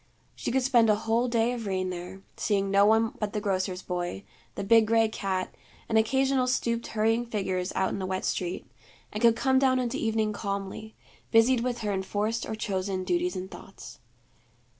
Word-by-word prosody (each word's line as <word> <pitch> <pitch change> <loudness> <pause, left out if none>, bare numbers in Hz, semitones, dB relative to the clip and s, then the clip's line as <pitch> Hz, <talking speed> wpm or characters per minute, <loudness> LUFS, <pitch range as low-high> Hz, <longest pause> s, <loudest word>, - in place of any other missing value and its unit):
She - - -3
could 265 +1 +1
spend 240 -4 +4
a 210 - +5
whole 225 +3 0
day 235 0 +1
of 230 -3 -5
rain 185 -1 -1
there, 180 +2 -8
seeing 200 -2 0
no 200 +1 +5
one 220 +1 +3
but 210 -1 -3
the 210 - -1
grocer's 185 -2 -2
boy, 175 - -4 0.3
the - - -4
big 220 +2 +5
gray 225 0 +4
cat, 195 -4 -3 0.3
and 225 - -2
occasional 265 +3 +2
stooped 235 -2 -1
hurrying 225 +2 +1
figures 190 -5 -2
out 190 0 +1
in - - -4
the 190 - -3
wet 185 0 -2
street 180 -1 -2 0.5
and 210 - -4
could 230 -1 +5
come 265 +3 +2
down 260 -1 +3
into 245 -2 -1
evening 220 -1 0
calmly, 200 +1 -5 0.3
busied 230 +3 +4
with 245 0 -2
her 210 -2 -1
enforced 205 +4 -2
or 220 - -3
chosen 190 -2 -2
duties 350 - 0
and 185 +1 -6
thoughts. - - -11
215 Hz, 185 wpm, -27 LUFS, 190-235 Hz, 0.5 s, a